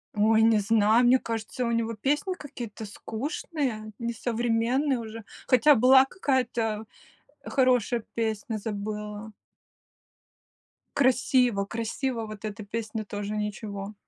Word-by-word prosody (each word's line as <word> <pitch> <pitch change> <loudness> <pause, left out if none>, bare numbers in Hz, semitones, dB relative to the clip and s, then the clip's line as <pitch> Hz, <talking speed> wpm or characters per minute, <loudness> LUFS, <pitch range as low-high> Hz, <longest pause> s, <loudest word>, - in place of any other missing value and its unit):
Ой, 220 +1 +4
не 225 -1 +5
знаю, 220 +3 +4
мне 255 +2 +6
кажется, 230 +2 -3
у 235 - 0
него 230 0 0
песни 290 - 0
какие-то 250 - -8
скучные, 225 - -4
несовременные 235 +3 0
уже. 225 0 -7 0.2
Хотя 255 +4 +6
была 260 +3 +7
какая-то 240 - -1 0.6
хорошая 250 -4 +2
песня, 220 -1 -2
забыла 210 0 -5 1.7
"Красиво 250 -5 +3
красиво", 230 +2 -3
вот 215 -1 -9
эта 210 0 -5
песня 220 +1 -4
тоже 205 +1 -4
ничего. 210 -1 -4
225 Hz, 105 wpm, -27 LUFS, 215-250 Hz, 1.7 s, была